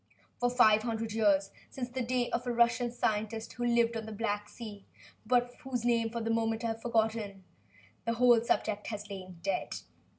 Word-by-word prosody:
For 245 - +2
five 220 -4 +5
hundred 225 -1 -2
years 200 -3 +3 0.2
since 250 -2 -4
the 255 +1 -4
days 245 0 0
of 245 +1 -1
a - - +1
Russian 235 0 +3
scientist 220 -1 -2
who 245 -1 -3
lived 235 -1 +3
on 225 -1 -4
the - - -6
Black 205 -1 -2
Sea, 210 -4 -9 0.4
but 245 +1 +2
whose 255 -4 -3
name, 230 -2 +2
for 230 +1 -4
the 225 0 -1
moment, 225 0 0
I 230 - 0
have 225 0 -4
forgotten 220 -4 0 0.6
the 230 - +2
whole 240 -1 +6
subject 215 -2 0
has 210 -2 -5
lain 185 -2 -8
dead. 195 -2 -1
225 Hz, 190 wpm, -31 LUFS, 215-240 Hz, 0.6 s, whole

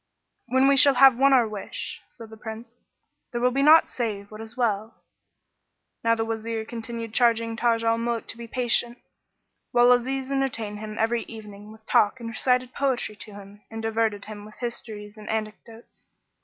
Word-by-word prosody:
"When 260 +2 +3
we 275 0 +4
shall 280 -1 +7
have 265 0 +7
won 275 +1 +5
our 250 -4 +5
wish," 210 -2 -6
said 225 -2 -13
the - - -9
Prince, 225 +1 -9 0.6
"there 240 - -3
will 250 +1 +2
be 275 +2 0
naught 310 +3 +7
save 210 -4 -4
what 215 +1 -9
is 225 +2 -11
well!" 220 -2 -1 1.1
Now 230 0 +3
the 225 0 -2
Wazir 225 0 -3
continued 230 -1 -6
charging 230 -1 +2
Taj 230 0 +1
al 230 0 +2
Muluk 235 -1 -2
to - - -5
be 235 - -7
patient, 240 0 +1 0.7
whilst 245 0 +5
Aziz 270 0 -3
entertained 230 -6 -2
him 215 0 -7
every 230 +1 +1
evening 210 -2 -11
with 220 0 -16
talk 210 +5 +2
and 235 - -7
recited 250 +2 0
poetry 260 -6 -1
to 210 +1 -10
him 205 +1 -13
and 225 - -7
diverted 225 -2 -1
him 210 -1 -9
with 215 0 -13
histories 220 -3 -6
and 210 0 -10
anecdotes. 220 +1 -7
230 Hz, 180 wpm, -25 LUFS, 215-245 Hz, 1.1 s, shall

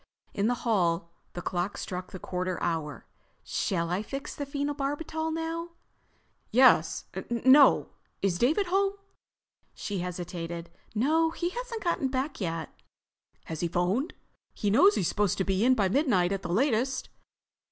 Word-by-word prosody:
In 200 +2 +1
the 245 - +2
hall, 170 -6 +1 0.2
the 175 - -6
clock 180 +2 -2
struck 180 0 -5
the - - -6
quarter 185 0 -3
hour. 160 -3 -2 0.4
"Shall 170 -2 -1
I 180 +3 0
fix 275 +6 -6
the 285 - -5
phenobarbital 290 +3 -2
now?" 330 +1 -3 0.8
"Yes—no. 245 - +4 0.3
Is 180 -3 +1
David 310 +12 +3
home?" 390 +2 +2 0.8
She 200 -2 -4
hesitated. 170 -1 -5 0.2
"No, 315 +8 +3
he 345 +1 -2
hasn't 475 +1 -5
got 335 -6 0
back 260 0 -2
yet." 165 -3 -2 0.8
"Has 160 -2 -5
he 175 - 0
phoned? 180 - 0 0.4
He 205 - 0
knows 370 - +6
he's 175 - +1
supposed 205 -3 +1
to 190 - +1
be 190 +2 +1
in 255 +1 +5
by 200 -5 +2
midnight 195 - +2
at 195 -1 -1
the 175 - -6
latest." 255 +5 +1
215 Hz, 140 wpm, -28 LUFS, 180-290 Hz, 0.8 s, knows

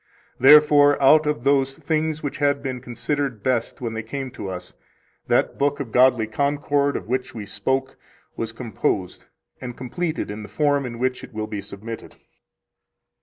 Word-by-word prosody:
Therefore, 145 0 +7
out 150 +3 +5
of 150 -6 -1
those 135 -1 +2
things 155 -1 -1
which 145 - -3
had 145 -1 +1
been 130 -2 -4
considered 130 -1 -3
best 125 -2 -1
when 115 -2 -3
they 110 - -3
came 130 +4 -5
to 100 - -6
us, 90 -1 -7 0.5
that - - +1
book 145 +1 +1
of 130 -5 -5
godly 125 -2 +4
concord 140 +4 0
of - - -8
which 130 +1 -2
we 105 -2 -6
spoke 130 +6 -2 0.4
was 115 -1 -3
composed, 110 -5 -3 0.4
and 125 -2 -7
completed 155 - -3
in 105 +1 -6
the 105 - -9
form 145 -3 +1
in 115 -1 -7
which 125 +1 -1
it 120 - -11
will 110 0 -2
be 105 -2 -5
submitted. 105 +3 -8
130 Hz, 170 wpm, -23 LUFS, 115-145 Hz, 0.5 s, Therefore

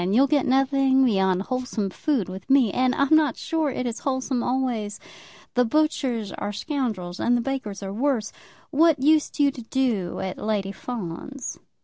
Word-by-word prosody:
You'll 210 +9 +4
get 280 -1 +1
nothing 270 0 +3
beyond 190 -5 +2
wholesome 250 -5 -3
food 260 - -1
with 190 +4 -9
me. 265 -7 +4
And 255 0 +2
I'm 280 +3 +4
not 305 -5 +3
sure 320 -2 -1
it 255 -1 -3
is 235 -2 -3
wholesome 260 -2 -1
always. 240 -5 -1 0.5
The 250 - +3
butchers 250 -5 0
are 205 - -4
scoundrels, 210 - -3
and 245 0 +2
the - - 0
bakers 235 -6 -4
are 195 0 -5
worse. 240 -2 0 0.4
What 320 +1 +4
used 305 +1 +3
you 285 -1 +4
to 255 - -9
do 225 -7 -1
at 190 -1 -4
Lady 205 -2 -1
Fawn's?" 235 +5 -6
250 Hz, 165 wpm, -24 LUFS, 205-275 Hz, 0.5 s, You'll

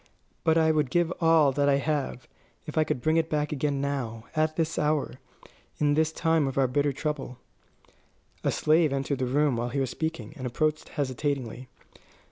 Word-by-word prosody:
But 160 -1 +3
I 160 -1 +4
would 150 -4 +1
give 175 +3 +1
all 160 -4 +5
that 140 +1 +1
I 140 - +4
have, 140 -3 -2 0.4
if 150 - -7
I 155 - +4
could 130 -5 -2
bring 155 +5 +2
it 165 0 +1
back 150 -1 -1
again 145 -1 -1
now, 130 -5 -3
at 155 0 +1
this 165 -1 -1
hour, 150 -3 0 0.6
in 145 -1 +2
this 160 +1 +2
time 160 -3 +1
of 135 - -4
our 135 - +4
bitter 145 +3 +1
trouble." 140 -3 -4 1.1
A - - +2
slave 155 0 +3
entered 135 0 -1
the 130 - 0
room 140 -1 +2
while 120 +1 -2
he 140 - -2
was 130 -2 -1
speaking, 160 -2 -4
and 130 -4 -5
approached 155 +5 -1
hesitatingly. 130 -3 -3
145 Hz, 185 wpm, -27 LUFS, 135-155 Hz, 1.1 s, all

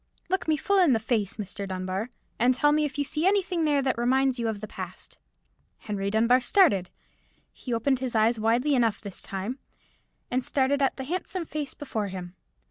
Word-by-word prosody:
"Look 380 -1 -1
me 310 -1 +2
full 395 +6 +2
in 345 -8 +5
the 225 - +2
face, 220 -3 -1
Mr. 200 -1 -5
Dunbar, 185 +4 -3 0.3
and 250 +2 +4
tell 295 +4 +3
me 300 0 +2
if 280 -1 -5
you 290 - +1
see 305 +5 0
anything 375 -4 +1
there 290 -2 +2
that 260 -3 0
reminds 260 +1 +2
you 230 - 0
of 220 -2 -2
the 215 - -6
past." - - -8 0.6
Henry 200 -2 -3
Dunbar 230 +4 +3
started. 245 - +4 0.6
He 250 - -8
opened 250 +3 +1
his 255 -3 -3
eyes 220 +1 +3
widely 235 +6 +2
enough 230 -5 +2
this 200 -3 -7
time, 200 +7 -4 0.7
and 255 +1 +1
started 280 +2 +1
at 270 - +1
the 265 - -4
handsome 360 +3 -3
face 300 -3 -5
before 225 -8 -3
him. 180 -2 -7
250 Hz, 195 wpm, -27 LUFS, 215-290 Hz, 0.7 s, in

